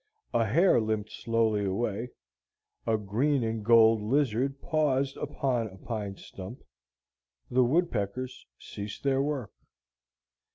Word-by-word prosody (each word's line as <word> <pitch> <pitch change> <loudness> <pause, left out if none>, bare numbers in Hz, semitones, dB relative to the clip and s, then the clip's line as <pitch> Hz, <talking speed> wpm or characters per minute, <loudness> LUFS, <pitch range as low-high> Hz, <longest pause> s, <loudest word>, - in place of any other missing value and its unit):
A 115 -1 +2
hare 165 - +4
limped 110 -1 -2
slowly 115 -3 +1
away, 105 +4 -1 0.8
a 110 -1 +3
green 120 +7 +1
and 110 -1 -2
gold 115 0 +6
lizard 135 +3 +1
paused 140 -5 +1
upon 130 -5 -1
a 95 -2 -12
pine 100 -2 -5
stump, 95 +6 -10 0.9
the 130 +1 +4
woodpeckers 130 - -1
ceased 100 0 -8
their 135 -1 +2
work. 140 -5 -2
115 Hz, 115 wpm, -29 LUFS, 105-135 Hz, 0.9 s, gold